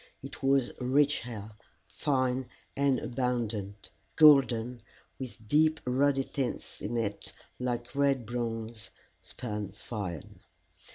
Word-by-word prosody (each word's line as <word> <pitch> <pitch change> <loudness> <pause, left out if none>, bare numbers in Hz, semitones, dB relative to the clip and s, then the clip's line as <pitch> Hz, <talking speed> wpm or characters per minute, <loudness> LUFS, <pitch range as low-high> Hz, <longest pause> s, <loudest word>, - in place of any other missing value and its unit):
It 135 - -9
was 135 -2 +3
rich 140 +3 +3
hair, 110 -3 -7 0.3
fine 130 -3 0 0.3
and 140 -2 +3
abundant, 115 -5 -2 0.2
golden, 125 -6 +5 0.4
with 120 -4 -8
deep 155 +4 +4
ruddy 135 +2 +2
tints 135 -1 -4
in 120 - -2
it 105 -3 -3 0.3
like 120 -1 -3
red 140 -3 +2
bronze 115 -3 -4 0.3
spun 105 -4 -5
fine. 95 - -6
125 Hz, 105 wpm, -30 LUFS, 110-135 Hz, 0.4 s, golden